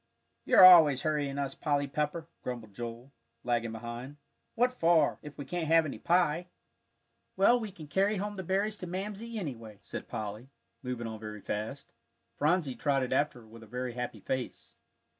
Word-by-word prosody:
"You're 185 - +8
always 160 -7 +8
hurrying 145 -3 -1
us, 140 -1 -2
Polly 145 -1 0
Pepper," 150 +3 -2
grumbled 115 -4 -6
Joel, 120 +4 -7 0.3
lagging 120 -2 0
behind. 120 +5 -7 0.4
"What 245 +2 +2
for, 165 - +3
if 150 -1 -11
we 145 - -6
can't 175 0 -3
have 165 0 +5
any 145 - -5
pie?" 175 -1 +2 0.9
"Well, 235 +6 +5
we 220 -3 -5
can 165 -5 -11
carry 195 +8 +1
home 205 +2 -3
the 190 - -4
berries 200 +4 0
to 180 - -6
Mamsie, 210 +5 -5
anyway," 115 - -6
said - - -7
Polly, 110 +4 -6 0.3
moving 125 -2 -4
on 110 -1 -6
very 105 -1 -7
fast. 110 +9 -5 0.4
Phronsie 155 -2 +1
trotted 135 -2 0
after 135 -2 0
her 110 - -17
with 115 +1 -13
a 110 - -13
very 125 +2 -4
happy 120 -3 -5
face. 130 +4 -4
145 Hz, 170 wpm, -30 LUFS, 120-175 Hz, 0.9 s, You're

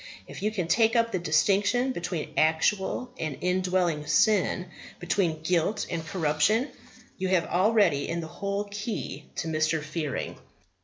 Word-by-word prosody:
If - - -10
you 210 - +1
can 190 -6 -3
take 225 +6 +3
up 230 0 +3
the 185 - -1
distinction 200 +10 +2
between 175 -6 -4
actual 190 +9 +1
and 155 -4 -3
indwelling 180 -4 0
sin, 190 +2 +3 0.3
between 175 -3 0
guilt 180 +5 +1
and 165 -2 -2
corruption, 170 - +1 0.5
you 190 - 0
have 185 -3 +2
already 190 -6 +2
in 170 +1 -2
that - - -6
the 160 - -12
whole 200 0 -2
key 200 - -5
to - - -3
Mr. 155 0 0
Fearing. 150 -2 -4
180 Hz, 150 wpm, -27 LUFS, 160-205 Hz, 0.5 s, take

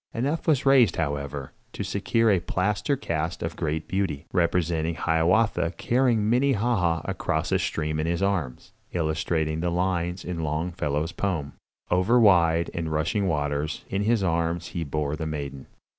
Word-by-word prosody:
Enough 140 +9 -1
was 145 -4 +2
raised, 130 -8 +5
however, 70 -3 -3 0.2
to - - -4
secure 115 -1 +1
a 95 - +3
plaster 105 - 0
cast 85 - -3
of 80 0 -3
great 80 -1 -2
beauty, 90 -6 -2
representing 85 -2 +1
Hiawatha 85 +2 +2
carrying 120 -4 +2
Minnehaha 115 - +2
across - - -2
a - - +3
stream 75 -1 -2
in 80 - -1
his 85 +3 0
arms, 85 -11 -2 0.2
illustrating 80 -1 -1
the 85 +1 0
lines 90 0 -1
in 90 -2 -4
Longfellow's 80 0 -2
poem: 85 -6 -2 0.4
"Over 90 +8 +4
wide 85 -6 +4
and 80 -2 -3
rushing 80 +6 0
rivers 75 0 -2
In 100 - -1
his 110 0 +2
arms 85 -1 0
he 85 - -3
bore 75 0 -2
the 80 0 -4
maiden." 70 -3 -5
85 Hz, 150 wpm, -26 LUFS, 80-100 Hz, 0.4 s, raised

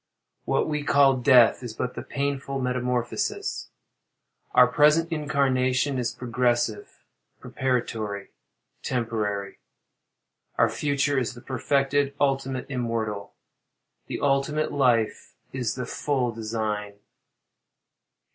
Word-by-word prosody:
What - - +1
we 150 -1 -1
call 140 -2 +4
"death," 125 -2 +5
is 120 -3 -7
but 125 +2 -3
the - - -6
painful 140 -1 -3
metamorphosis. 125 -1 -2 0.9
Our - - +8
present 155 +3 +3
incarnation 135 -2 +1
is 120 -2 -1
progressive, 120 -2 -1 0.3
preparatory, 115 -6 -2 0.5
temporary. 105 -5 -2 1.0
Our - - +4
future 145 -1 +1
is 125 -1 -3
perfected, 140 +2 0
ultimate, 135 -2 0
immortal. 115 -6 -3 0.7
The - - -5
ultimate 145 +2 +1
life 120 -6 +1 0.2
is 125 -4 -2
the 125 -1 -4
full 130 -2 -1
design. 110 -2 -3
125 Hz, 95 wpm, -25 LUFS, 115-140 Hz, 1.0 s, Our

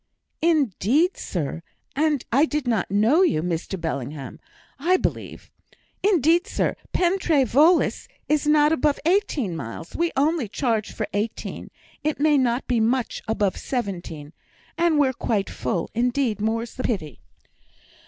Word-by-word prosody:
"Indeed, 305 - +2
sir, 165 -2 -4 0.3
and 300 -2 +1
I 275 +6 +5
did 300 -4 -3
not 225 -6 0
know 220 - +3
you; 160 - +2
Mr 175 +2 -3
Bellingham, 140 -3 -5 0.4
I 355 +6 +3
believe. - - -4 0.5
Indeed, 350 - +3
sir, - - -1 0.2
Pen 365 +2 +1
trê 300 -7 +2
Voelas 305 +9 +3 0.2
is 300 -1 +1
not 300 0 +5
above 300 -1 +1
eighteen 325 - +1
miles 140 +2 -7
we 340 0 +1
only 295 -2 +1
charge 225 -1 -1
for - - -3
eighteen; 210 +2 -4 0.3
it 305 -1 -1
may 300 0 +4
not 245 0 0
be 245 -2 +1
much 235 +2 0
above 210 -3 0
seventeen; 175 - -5 0.4
and 335 -2 +2
we're 275 -3 +3
quite 215 -5 -1
full, 170 - -3
indeed, 240 -2 0
more's 230 +2 -1
the 255 - -6
pity." 155 - -3
250 Hz, 140 wpm, -23 LUFS, 205-305 Hz, 0.5 s, I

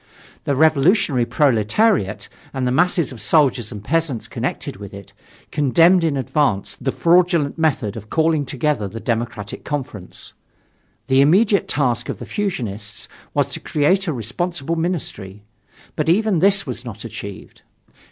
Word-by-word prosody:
The 140 - +1
revolutionary 155 - +3
proletariat, 135 - +2 0.3
and 130 -1 -1
the 125 - +1
masses 170 +2 +2
of 120 -4 -9
soldiers 125 -1 +2
and 105 -3 -8
peasants 155 -2 -1
connected - - -4
with 100 0 -9
it, 100 -2 -12 0.4
condemned 165 +5 +4
in 155 -4 +1
advance 130 -6 0
the 135 +1 0
fraudulent 170 -3 +2
method 135 -10 0
of 110 -1 -9
calling 160 -2 +2
together 135 -4 -1
the 115 +4 -7
Democratic 115 -3 -3
Conference. 130 - -6 0.7
The 135 +1 +4
immediate 195 +8 +4
task 125 -5 0
of - - -3
the - - -8
fusionists 110 - -4 0.3
was - - +2
to - - -5
create 185 +7 +1
a 160 - 0
responsible 160 - -3
ministry. 120 - -4 0.5
But 155 +1 0
even 200 0 +3
this 195 +2 +3
was 125 -3 -6
not 115 -2 -8
achieved. 100 -3 -9
140 Hz, 140 wpm, -20 LUFS, 115-165 Hz, 0.7 s, condemned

